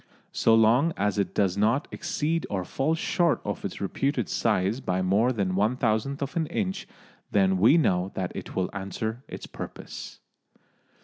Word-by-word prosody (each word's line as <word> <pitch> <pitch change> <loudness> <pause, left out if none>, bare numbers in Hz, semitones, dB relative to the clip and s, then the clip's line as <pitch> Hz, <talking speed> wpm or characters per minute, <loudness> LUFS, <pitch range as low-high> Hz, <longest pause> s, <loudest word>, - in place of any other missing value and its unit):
So 115 - +4
long 120 +9 +4
as 105 +1 0
it 100 - -1
does 100 -2 +1
not 115 +8 +2
exceed 165 -1 -2
or 95 -3 -2
fall 145 - 0
short 170 0 +1
of 105 - -3
its 95 - -5
reputed 120 - -1
size 95 +7 +1
by 95 -7 -1
more 105 +7 +3
than 100 -6 -1
one 105 +6 +2
thousandth 125 +5 0
of 140 +5 -5
an 165 -2 0
inch, 190 +2 -3 0.4
then 95 -2 +3
we 115 - +6
know 90 - +2
that 90 -2 -2
it - - -7
will 95 -1 -1
answer 110 +5 -4
its - - -7
purpose. - - -8
110 Hz, 170 wpm, -27 LUFS, 95-140 Hz, 0.4 s, we